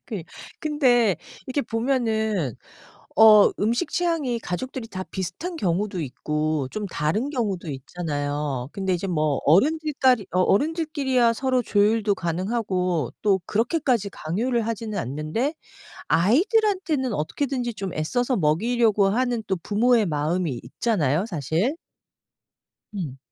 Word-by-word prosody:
그니 190 -7 -4 0.4
근데 245 - +3 0.3
이렇게 270 +2 -1
보면은 220 - 0 0.6
어 215 -1 +8
음식 235 +10 0
취향이 320 -9 0
가족들이 235 +6 -5
다 185 -3 -5
비슷한 195 - -4
경우도 190 - -1
있고 150 +1 -2
좀 210 -1 -4
다른 190 - -1
경우도 205 - -2
있잖아요. 145 -2 -3
근데 190 -2 -1
이제 180 +3 -3
뭐 155 -5 0
어른들 300 - +3
까리 250 -7 +4
어 180 - +2
어른들 315 - +2
끼리야 255 -5 +2
서로 260 0 +1
조율도 210 0 +2
가능하고 180 - -1
또 195 -3 +3
그렇게까지 235 - 0
강요를 225 +10 -1
하지는 220 -1 -3
않는데 155 - -2 0.6
아이들한테는 315 - +2
어떻게든지 245 - -2
좀 195 -3 -5
애써서 245 - 0
먹이려고 210 +6 +2
하는 240 +1 0
또 190 - +1
부모의 225 +2 +2
마음이 155 -3 -1
있잖아요, 160 - 0
사실. 170 - -1 1.2
음. 150 -9 -4
210 Hz, 295 characters per minute, -24 LUFS, 170-250 Hz, 1.2 s, 어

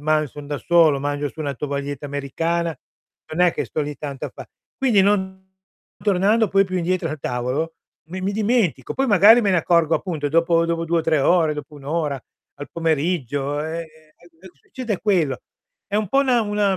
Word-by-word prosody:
ma 155 0 +1
son 145 +1 -10
da 145 -1 -3
solo, 160 -4 +4
mangio 145 +1 -2
su 160 - -11
una 145 -2 -2
tovaglietta 140 +1 -4
americana, 165 +4 -2 0.6
non 180 +3 +3
è 170 - +2
che - - -2
sto 155 - -4
lì 145 0 -5
tanto 140 -3 -6
a - - -10
fa - - -9 0.3
quindi 235 -8 +4
non 190 -1 0 0.6
tornando 205 +2 +3
poi 195 +1 +3
più 185 -1 -4
indietro 180 0 -1
al 155 - -5
tavolo 130 +7 -2 0.3
mi 185 +2 -6
mi 195 +2 -1
dimentico, 215 - 0
poi 270 0 0
magari 210 +3 +7
me 200 - +2
ne 180 - +3
accorgo 165 -1 +2
appunto 155 -6 -2
dopo 165 +2 +3
dopo 165 0 -1
2 170 +1 +1
o - - +2
3 160 -1 +2
ore, 160 0 +3
dopo 150 +1 -8
1 140 -2 -13
ora, 150 -2 -1 0.4
al 145 - -9
pomeriggio, 145 -3 -1
ehm, 165 +1 -4 0.8
succede 235 -7 -4
quello. 160 - +1 0.5
È 205 - -2
un 210 -2 0
po' 270 - +2
una 255 -3 +3
una 205 -2 +1
165 Hz, 190 wpm, -22 LUFS, 145-190 Hz, 0.8 s, magari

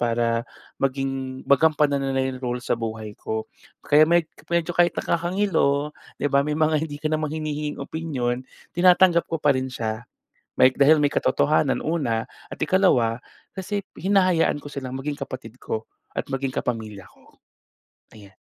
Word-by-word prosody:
para 115 -1 +1 0.4
maging 135 -1 -2
magampanan 145 0 +3
nila 135 -1 0
'yong 130 -1 -4
role 125 -1 -2
sa - - 0
buhay 110 -2 -4
ko. 110 0 -3 0.4
Kaya 155 +2 +5
med 170 -1 +4 0.2
medyo 170 0 0
kahit 175 0 +3
nakakangilo 170 -5 +1 0.2
'di - - -5
ba, 140 - +5
may 150 +1 -1
mga 155 0 +1
hindi 145 - -6
ka 155 +1 -3
naman 155 -1 0
hinihinging 150 -2 -3
opinyon, 130 -6 -3 0.2
tinatanggap 175 -1 +5
ko 165 - -1
pa 150 -2 +3
rin 130 0 -2
siya. 115 -1 -4 0.5
May 130 0 +6
dahil 145 +4 +5
may 145 - +2
katotohanan, 150 -2 +1
una 130 -8 0 0.2
at - - -8
ikalawa 130 - +2 0.3
kasi 200 +1 -4
hinahayaan 185 -5 +2
ko 145 0 -9
silang 130 -2 -5
maging 145 +2 -3
kapatid 125 -1 -8
ko 110 0 -4 0.3
at - - -1
maging 135 0 -1
kapamilya 110 -6 -4
ko. - - -24 0.8
Ayan. 100 -3 -15
140 Hz, 155 wpm, -24 LUFS, 125-160 Hz, 0.8 s, May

